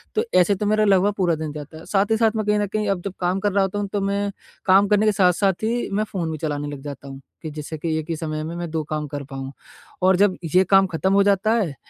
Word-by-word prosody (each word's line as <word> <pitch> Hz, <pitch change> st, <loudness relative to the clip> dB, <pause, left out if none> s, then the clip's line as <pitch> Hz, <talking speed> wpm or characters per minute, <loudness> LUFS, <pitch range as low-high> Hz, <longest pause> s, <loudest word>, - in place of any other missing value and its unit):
तो 440 Hz, -, +2 dB, 0.2 s
ऐसे 200 Hz, +3 st, +3 dB
तो 205 Hz, +2 st, -3 dB
मेरा 215 Hz, +1 st, +2 dB
लगभग 200 Hz, +1 st, +3 dB
पूरा 175 Hz, -4 st, +2 dB
दिन 155 Hz, -1 st, -5 dB
जाता 150 Hz, +1 st, -9 dB
है। 160 Hz, -, -12 dB
साथ 200 Hz, +1 st, +1 dB
ही 220 Hz, -, +3 dB
साथ 225 Hz, -1 st, +3 dB
मैं 215 Hz, -1 st, -1 dB
कहीं 210 Hz, 0 st, +2 dB
न 205 Hz, -, 0 dB
कहीं 210 Hz, +1 st, -2 dB
अब 190 Hz, -3 st, 0 dB
जब 195 Hz, -, -3 dB
काम 180 Hz, +2 st, 0 dB
कर 205 Hz, 0 st, 0 dB
रहा 200 Hz, 0 st, +2 dB
होता 195 Hz, +2 st, -2 dB
हूँ 205 Hz, -, -2 dB
तो 205 Hz, -, 0 dB
मैं 200 Hz, +1 st, -1 dB, 0.3 s
काम 195 Hz, +1 st, +5 dB
करने 210 Hz, +1 st, +3 dB
के 215 Hz, -, +4 dB
साथ-साथ 190 Hz, 0 st, +2 dB
ही 235 Hz, +2 st, -1 dB
मैं 210 Hz, +2 st, +1 dB
फ़ोन 170 Hz, -4 st, -2 dB
भी 155 Hz, -, -4 dB
चलाने 145 Hz, -1 st, -3 dB
लग 145 Hz, -2 st, -7 dB
जाता 140 Hz, -1 st, -8 dB
हूँ 135 Hz, 0 st, -9 dB, 0.2 s
कि 155 Hz, -2 st, -6 dB
जिससे 155 Hz, +1 st, -6 dB
कि 160 Hz, +1 st, -2 dB
एक 160 Hz, +2 st, -8 dB
ही 165 Hz, -, -1 dB
समय 155 Hz, -1 st, -4 dB
में, 165 Hz, +2 st, -5 dB
मैं 175 Hz, -1 st, -4 dB
2 160 Hz, -1 st, -1 dB
काम 150 Hz, 0 st, -4 dB
कर 145 Hz, 0 st, -6 dB
पाऊँ। 135 Hz, 0 st, -5 dB, 0.5 s
और 185 Hz, 0 st, +4 dB
जब 195 Hz, 0 st, +3 dB, 0.2 s
ये 185 Hz, -, +7 dB
काम 195 Hz, -1 st, +5 dB
ख़त्म 185 Hz, +3 st, 0 dB
हो 200 Hz, 0 st, +5 dB
जाता 200 Hz, +2 st, +2 dB
है 195 Hz, -11 st, 0 dB
190 Hz, 285 wpm, -22 LUFS, 155-205 Hz, 0.5 s, ये